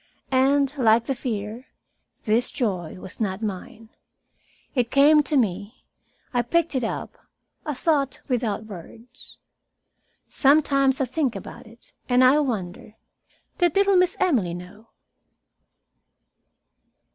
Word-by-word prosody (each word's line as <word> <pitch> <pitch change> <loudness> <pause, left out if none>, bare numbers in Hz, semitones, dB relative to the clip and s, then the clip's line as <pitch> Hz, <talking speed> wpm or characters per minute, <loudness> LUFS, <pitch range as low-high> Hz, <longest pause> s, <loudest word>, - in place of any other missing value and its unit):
And, 275 +2 +2
like 225 -1 +4
the 270 - -2
fear, 230 -1 -5 0.6
this 225 +3 +1
joy 185 -9 -3
was 185 - -10
not 205 -1 -2
mine. 215 +2 -6 0.8
It 245 -4 0
came 295 +3 +5
to 290 +1 0
me. 210 0 -2 0.5
I 245 - +2
picked 335 +7 0
it 260 -2 -1
up 225 - -5 0.5
a 300 - -2
thought 280 -2 0
without 225 -4 -2
words. 220 +5 -12 0.9
Sometimes 275 -2 +3
I - - +2
think 255 -1 -1
about - - -9
it, 230 +1 -16 0.2
and 250 +1 +4
I 265 +4 +6
wonder 210 -7 -4 0.6
did 350 -4 +2
little 395 0 +4
Miss 365 -1 +3
Emily 230 - +1
know? 180 +5 -12
245 Hz, 120 wpm, -24 LUFS, 215-280 Hz, 0.9 s, I